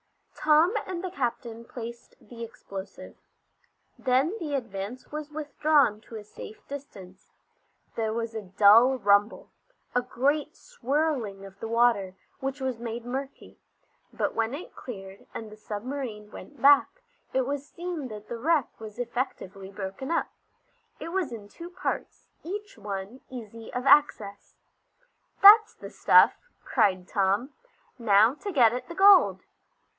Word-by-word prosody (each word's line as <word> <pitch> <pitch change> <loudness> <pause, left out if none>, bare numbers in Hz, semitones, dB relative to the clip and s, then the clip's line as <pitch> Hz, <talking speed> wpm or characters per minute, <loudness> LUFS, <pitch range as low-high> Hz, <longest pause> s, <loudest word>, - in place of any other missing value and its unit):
Tom 315 +5 +4
and 365 -1 -5
the 370 - -4
captain 235 -5 -4
placed 235 0 -9
the 235 -1 -10
explosive. 200 -3 -9 0.8
Then 265 - +1
the 300 -5 -3
Advance 230 -1 -6
was 300 0 -5
withdrawn 295 -6 +1
to 225 - -12
a 215 - -7
safe 210 +1 -12
distance. 195 -10 -10 0.6
There 220 -1 -1
was 230 0 -3
a 220 - -4
dull 210 +7 +5
rumble, 205 0 +2 0.4
a 245 - +2
great 275 +4 -1
swirling 270 - -2
of 195 0 -14
the 225 - -5
water, 225 -5 +2 0.2
which 270 +1 -4
was 260 -3 -3
made 235 0 -5
murky; 270 +3 -7 0.5
but - - -2
when 225 +3 -1
it 340 - -10
cleared, 195 -5 -10
and 220 -1 -7
the - - -10
submarine 215 0 -6
went 290 - -12
back, 290 - +4 0.3
it 260 -1 +1
was 285 +2 -4
seen 340 -5 -5
that 210 -2 -10
the 235 - -6
wreck 305 +1 +2
was 215 -1 -10
effectively 235 -6 -4
broken 195 +6 -6
up. 335 - 0 0.7
It 330 - -6
was 355 -6 -2
in 215 -3 -8
two 340 +10 -10
parts, 365 +1 -5
each 410 +4 -6
one 200 +4 -6
easy 230 -3 -9
of 250 +1 -4
access. 215 -9 +3 0.9
"That's 430 +2 +9
the - - -10
stuff!" - - +5 0.3
cried 185 -2 +1
Tom. 200 +7 0 0.5
"Now 220 +1 +5
to 405 +7 -6
get 240 - +5
at 250 - -5
the 340 - -8
gold!" 395 0 +6
240 Hz, 140 wpm, -27 LUFS, 210-290 Hz, 0.9 s, That's